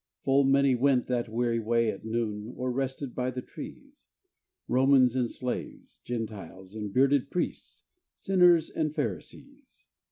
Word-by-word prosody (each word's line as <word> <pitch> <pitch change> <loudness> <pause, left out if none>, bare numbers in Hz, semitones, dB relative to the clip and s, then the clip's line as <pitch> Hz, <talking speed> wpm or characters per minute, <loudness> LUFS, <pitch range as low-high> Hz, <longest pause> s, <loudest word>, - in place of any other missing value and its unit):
Full 135 +1 +3
many 140 0 +4
went 125 0 +2
that 120 -2 -2
weary 115 +1 0
way 115 0 +1
at 100 - -10
noon, 110 0 -3
Or 125 0 -2
rested 135 0 -3
by 125 0 -1
the 125 0 -5
trees, - - -11 0.6
Romans 130 -1 +4
and 125 -2 +1
slaves, 125 -1 -6
Gentiles 105 -5 -6
and 105 -2 -5
bearded 135 +3 +3
priests, 180 - -4 0.3
Sinners 180 -4 +4
and 155 -1 -2
Pharisees. 280 -1 -6
125 Hz, 135 wpm, -28 LUFS, 115-140 Hz, 0.6 s, many